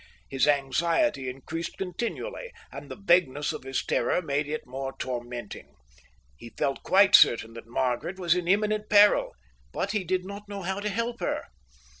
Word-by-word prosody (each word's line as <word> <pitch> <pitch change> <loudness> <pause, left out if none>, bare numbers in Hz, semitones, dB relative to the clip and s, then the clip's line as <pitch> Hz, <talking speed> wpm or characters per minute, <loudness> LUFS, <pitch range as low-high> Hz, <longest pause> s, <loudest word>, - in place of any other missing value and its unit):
His 135 +1 +1
anxiety 145 - +1
increased 155 +6 -6
continually, 240 - -4 0.2
and - - -9
the - - -6
vagueness 170 -8 +2
of - - -6
his 135 0 -3
terror 120 - +1
made 145 -3 -1
it 155 +1 -4
more 135 +1 -5
tormenting. 120 -3 -6 0.6
He 115 - -11
felt 135 - -1
quite 195 +1 +4
certain 115 -1 +6
that 115 0 -10
Margaret 125 +8 -2
was 175 -3 +2
in 180 -1 -2
imminent 210 +2 +1
peril, 205 0 +5 0.4
but - - -2
he 210 -3 -1
did 185 +1 -1
not 200 +1 -9
know 200 -2 -6
how 190 +2 -2
to 210 +1 -2
help 230 +3 -3
her. - - -2
170 Hz, 165 wpm, -27 LUFS, 135-200 Hz, 0.6 s, certain